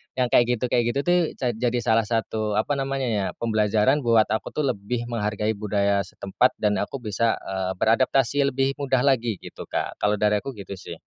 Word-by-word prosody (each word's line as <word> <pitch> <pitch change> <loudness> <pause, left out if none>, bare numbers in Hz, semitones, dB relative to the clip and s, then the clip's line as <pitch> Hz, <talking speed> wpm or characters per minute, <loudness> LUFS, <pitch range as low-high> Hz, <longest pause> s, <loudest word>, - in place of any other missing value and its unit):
yang 125 -2 0
kayak 120 - +5
gitu 125 - -1
kayak 120 - +3
gitu, 140 - +1
tuh, 175 +2 +3 0.2
ja 125 -2 -1
jadi 120 +2 -1
salah 115 0 +3
satu, 110 -2 -1
apa 105 +6 0
namanya, 135 0 -2
ya, 105 -4 0
pembelajaran 110 +4 +2
buat 115 -4 +4
aku, 110 - -1
tuh, 150 - 0
lebih 115 +3 -4
menghargai 105 -1 -1
budaya 100 -1 0
setempat 100 +6 0
dan 105 -1 +1
aku 120 +5 -4
bisa, 110 +1 +1
eee, 95 -1 -3
beradaptasi 130 +6 +2
lebih 135 0 +1
mudah 135 -3 +1
lagi, 120 -5 +2
gitu, - - -9
Kak. - - -3
Kalau 105 0 +2
dari 105 0 +2
aku 135 +5 -7
gitu, 100 -2 -10
sih. 85 - -8
115 Hz, 195 wpm, -24 LUFS, 105-130 Hz, 0.2 s, kayak